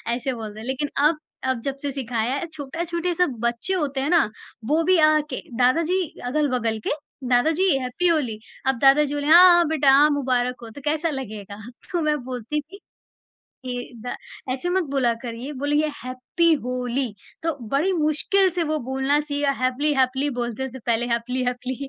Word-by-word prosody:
ऐसे 260 +2 -2
बोलते 220 -2 -7
लेकिन 265 +4 -2
अब, 300 +3 +4 0.3
अब, 260 -2 0
जब 275 +2 -3
से 285 - -2
सिखाया 245 -3 -2
है, 285 - -3
छोटा 300 +2 -4
छोटे 345 +1 -1
सब 355 0 +2
बच्चे 235 +10 -1
होते 285 -7 -1
हैं 280 - -1
ना, 340 -10 +4 0.4
वो 310 +7 +2
भी 370 +2 +4
आ-आ 310 0 +5
के 255 - -4 0.2
दादा 255 +6 +4
जी, 375 - +2 0.3
अगल-बगल 250 -5 0
के, - - +1 0.4
"दादा 245 +5 +4
जी 380 - +4
हैप्पी 255 +8 -1
होली।" 275 -10 +1 0.3
अब 265 -2 +2
दादा 275 +3 +6
जी 290 -1 -3
बोले, 290 0 -2
"हाँ, 340 +4 +9
हाँ 345 -1 +4
बेटा! 295 -3 +3
हाँ, 285 +3 +6
मुबारक 250 -2 0
हो," 230 - -8
तो 255 +6 -11
कैसा 310 +2 0
लगेगा? 215 -8 -6 0.3
तो 345 - 0
मैं 305 -1 +1
बोलती 255 +4 -3
थी 360 +7 -14 0.9
के, 245 0 -5
"दा 245 - -4 0.4
ऐसे, 270 +7 -3
मत 375 +1 +2
बोला 260 -4 +2
करिए, 245 +3 -6
बोलिए, 295 +1 +2
हैप्पी 255 +7 +1
होली।" 250 -1 -2 0.3
तो 330 -1 0
बड़ी 300 - +1
मुश्किल 340 +4 +2
से - - +3
वो 310 0 -1
बोलना 265 +2 +1
सीए 285 0 -1 0.2
हैपली-हैपली 265 +1 +1
बोलते 240 +2 -3
थे - - -6
पहले, 235 0 +1
हैपली-हैपली 250 +1 -2
270 Hz, 180 wpm, -23 LUFS, 250-305 Hz, 0.9 s, हाँ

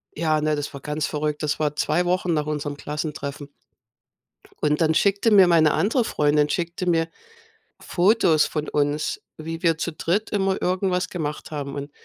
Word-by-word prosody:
Ja, 155 -1 +1
ne, 155 0 +1
das 145 0 -5
war 140 - -8
ganz 150 +1 -2
verrückt. 150 -1 -2
Das 150 -1 -1
war 150 -1 0
2 155 +4 +1
Wochen 180 -1 +1
nach 150 -2 0
unserem 150 -1 -3
Klassentreffen. 145 -1 -5 1.1
Und 150 0 +2
dann 160 -1 +3
schickte 200 +6 +2
mir 195 -4 +7
meine 160 -3 +5
andere 220 - +1
Freundin, 150 -3 +2
schickte 170 +2 -2
mir 165 -1 +1 0.7
Fotos 175 -4 +3
von 155 -1 -4
uns, 145 +1 -1 0.2
wie 165 +1 -6
wir 165 -2 +3
zu 170 - -2
dritt 180 +7 -1
immer 195 -2 0
irgendwas 180 0 0
gemacht 155 -5 -5
haben. 140 -2 -5
Und 140 +1 -6
155 Hz, 170 wpm, -23 LUFS, 150-180 Hz, 1.1 s, mir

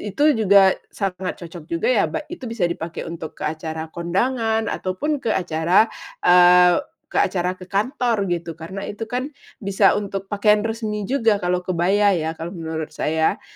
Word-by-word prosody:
itu 290 - +1 0.2
juga 200 -2 +6 0.2
sangat 190 -2 -3
cocok 170 -2 -10
juga 445 +9 0
ya, - - +3
ba - - -4
itu 275 -8 -6
bisa 225 -5 -3
dipakai 170 -1 -3
untuk 165 -1 -7
ke - - -8
acara 160 +1 -4
kondangan 225 +6 0
ataupun 270 +11 -2
ke 225 - -1
acara, 175 +2 +3 0.4
eee, 180 0 +6 0.3
ke - - -4
acara 185 -1 +1
ke 185 - -11
kantor 215 0 0
gitu, 170 -1 -3
karena 180 +5 -7
itu 220 +2 -6
kan 255 +4 -3 0.2
bisa 200 -1 +2
untuk 195 -1 -4
pakaian 210 0 +3
resmi 220 -2 -3
juga 225 -6 +2
kalau 180 0 -1
kebaya 190 +3 +2
ya, 160 -1 -2
kalau 170 +3 -6
menurut 160 -3 -5
saya. 160 +1 0
190 Hz, 165 wpm, -21 LUFS, 170-220 Hz, 0.4 s, juga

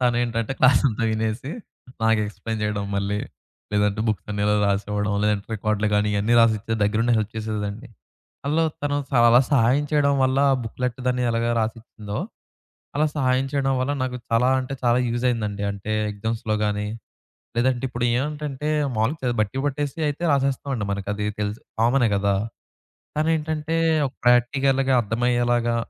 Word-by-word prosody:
తనేంటంటే, 120 -1 0
క్లాసంతా 125 -3 +4
వినేసి 110 +4 -2 0.5
నాకు 110 -1 +3
ఎక్స్‌ప్లైన్ 110 +2 -5
చేయడం 105 -1 -1
మళ్ళి. 100 +1 -1 0.5
లేదంటే, 105 0 +1
బుక్స్ 110 - -2
అన్నిఇలా 105 0 +1
రాసివ్వడం, 105 +1 0
లేదంటే 105 -1 0
రికార్డులు 105 0 0
గాని 105 0 +2
ఇయన్నీ 105 +4 +2
రాసిచ్చేది. 110 0 +2
దగ్గరుండి 115 +3 +1
హెల్ప్ 110 0 -2
చేసేదిలెండి. 110 +2 -4 0.6
అందులో 155 +3 +2 0.2
తను 145 0 0 0.2
చాలా 120 0 +6
సహాయం 130 +2 +3
చేయడం 140 -1 +3
వల్ల, 130 +1 +1
ఆ - - +4
బుక్‌లెట్ 125 +2 -3
దాన్ని 125 0 0
ఎలాగా 115 +1 0
రాసిచ్చిందో 110 -2 -5 0.8
అలా 155 +1 +3
సహాయం 130 -1 +2
చేయడం 135 -1 +1
వల్ల, 130 +3 0
నాకు 125 -1 -2
చాలా 115 +2 +3
అంటే 130 +1 -5
చాలా 120 0 +3
యూజ్ 120 +1 -2
అయిందండి. 105 -4 -2
అంటే 100 +2 -7 0.2
ఎగ్జామ్స్‌లో 110 +1 -2
గాని, 105 0 -1 0.7
లేదంటే 125 +1 +1
ఇప్పుడు 120 -1 -3
ఏవంటంటే 150 +1 -3 0.3
మాములుగా 115 +9 0
చదివి 120 -2 0
బట్టి 110 +5 -1
పట్టేసి 145 +1 -2
అయితే 145 +4 -4
రాసేస్తామండి. 135 -3 0
మనకి 100 0 -3
అది 105 0 -3 0.2
తెలుసు. 105 +1 -3 0.2
కామనే 120 +1 +3
గదా! 100 0 +1 0.8
తనేంటంటే, 155 0 0 0.3
ఒక - - -12
ప్రాక్టికల్‌గా 135 +2 +3
అర్థమయ్యేలాగా, 120 +1 +1
120 Hz, 140 wpm, -23 LUFS, 105-130 Hz, 0.8 s, చాలా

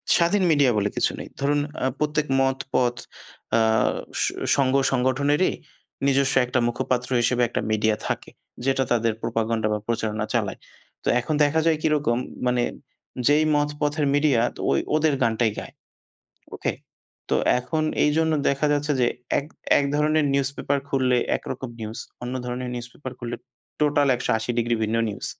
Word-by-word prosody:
স্বাধীন 175 +3 +3
মিডিয়া 145 -4 +4
বলে 105 0 +1
কিছু - - +1
নেই। - - -7
ধরুন 145 +1 +2 0.3
আ - - +3
প্রত্যেক 150 0 0 0.2
মত 135 0 +1 0.2
পথ 120 -1 +2 0.6
আ - - +4 0.6
স - - +3 0.3
সংঘ 135 -2 +2 0.2
সংগঠনেরই 135 +5 +2 0.5
নিজস্ব 135 0 +2
একটা 125 +1 0
মুখপাত্র 125 0 -1
হিসেবে 120 +1 +1
একটা - - -2
মিডিয়া 110 0 +2
থাকে। - - -3 0.4
যেটা 135 0 +2
তাদের 115 -1 +2
প্রোপাগান্ডা 115 -1 0
বা 105 - -1
প্রচারণা 110 -2 -1
চালায়। 110 -5 -1 0.4
তো - - -6
এখন 150 +6 -2
দেখা 145 +2 +2
যায় 160 -1 +3
কিরকম 145 -7 +1 0.3
মানে 125 -1 +2 0.6
যেই 150 +2 +4
মত 145 0 +2
পথের 150 0 +1
মিডিয়া 145 -5 +3 0.3
ওই 70 - +3 0.2
ওদের 155 -1 +3
গানটাই 115 -1 +2
গায়। - - -9 0.8
ওকে? - - -1 0.6
তো - - +3 0.2
এখন 155 +5 -2 0.2
এইজন্য 160 +2 +2 0.2
দেখা 140 +2 +1
যাচ্ছে 145 +1 0
যে 120 - +4 0.3
এক 140 - -3 0.3
একধরনের 150 +2 +1
নিউজপেপার 140 +1 0
খুললে 130 -2 +2 0.2
একরকম 130 - -6
নিউজ 110 +1 -5 0.2
অন্য 125 +1 -4
ধরনের 125 0 -4
নিউজপেপার 125 +2 -7
খুললে 120 -1 -4 0.4
টোটাল 145 -1 +3
১৮০° 120 0 0
ভিন্ন 110 +1 -1
নিউজ। 100 - -5
130 Hz, 145 wpm, -24 LUFS, 120-145 Hz, 0.8 s, মিডিয়া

